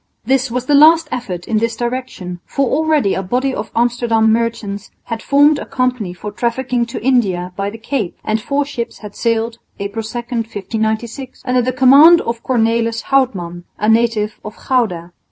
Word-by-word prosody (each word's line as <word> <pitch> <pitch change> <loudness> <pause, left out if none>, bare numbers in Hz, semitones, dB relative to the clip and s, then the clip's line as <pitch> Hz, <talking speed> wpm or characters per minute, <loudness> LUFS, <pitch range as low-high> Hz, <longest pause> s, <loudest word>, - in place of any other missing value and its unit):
This 265 +1 +1
was 250 +1 -3
the 290 - +1
last 320 +3 +6
effort 185 -8 -5
in 220 -2 +1
this 230 +1 -1
direction, 240 -8 -4
for 275 -1 0
already 300 -6 +1
a - - -1
body 250 +8 -1
of 210 - -4
Amsterdam 230 -2 +2
merchants 225 -3 -2
had 230 -1 -5
formed 285 +2 +4
a - - -6
company 250 -7 -1
for 195 +4 -7
trafficking 240 +2 -1
to 235 - -6
India 190 -9 +1
by 200 0 -2
the 220 - -9
Cape; 225 -4 -3
and 215 0 -1
four 280 +4 -1
ships 235 -4 -5
had 205 - -9
sailed, 230 0 -1 0.2
April 200 +3 -4
2, 220 +2 -6
1596, 230 +1 -4
under 250 -1 +2
the 255 +2 0
command 275 +7 +7
of 235 0 -4
Cornelis 230 -2 0
Houtman, 180 -11 0
a 210 - -1
native 220 -2 +1
of 210 - -8
Gouda. 180 -10 0
230 Hz, 170 wpm, -17 LUFS, 215-255 Hz, 0.2 s, command